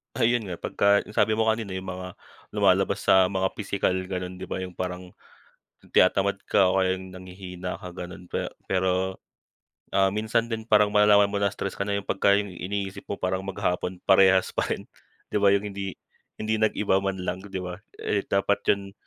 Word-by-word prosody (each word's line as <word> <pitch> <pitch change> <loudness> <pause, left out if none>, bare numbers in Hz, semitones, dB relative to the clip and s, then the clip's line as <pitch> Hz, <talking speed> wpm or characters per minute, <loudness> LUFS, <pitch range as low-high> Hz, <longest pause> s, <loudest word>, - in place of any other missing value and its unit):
Ayun 115 -2 +2
nga, 90 - -4
pagka 100 +4 +2
yung 105 - -13
sabi 110 - +3
mo 110 - +2
kanina 110 -4 -3
yung 95 0 -5
mga 90 0 -7 0.4
lumalabas - - +2
sa 95 -1 +5
mga 95 0 0
pisikal, 100 -2 0 0.2
gano'n, 90 -1 -5
'di 95 - -6
ba, 95 - -3
yung 90 - -6
parang 90 0 -5 0.8
tinatamad 100 +2 +3
ka 95 -2 +4
o 95 - +2
kaya 95 0 +2
nanghihina 95 0 -7
ka, 90 - -8
gano'n. 90 +1 -8
Pe - - -2 0.2
pero, 95 0 0 0.8
ah, 95 0 +3
minsan 110 +2 0
din 110 0 -4
parang 105 -1 +4
malalaman 105 -1 +5
mo 100 - 0
na 100 - +3
stress 100 - -4
ka - - 0
na 100 - 0
pagka 100 +1 +3
yung 100 -2 -2
iniisip 95 +2 -5
mo 100 - -3
parang 95 0 -1
maghapon 90 -1 -2
parehas 95 -1 +5
pa - - -1
rin, - - -3 0.5
'di - - 0
ba, 100 - +5
yung 100 +1 0
hindi 95 -1 -5 0.4
hindi 110 0 -1
nag-iba 105 -3 +2
man 95 0 -2
lang, 90 - -3
'di 95 -1 -6
ba? 90 +1 -6 0.2
Eh 100 - -1
dapat 100 +1 +1
'yon, 100 -1 -1
95 Hz, 185 wpm, -26 LUFS, 95-100 Hz, 0.8 s, sa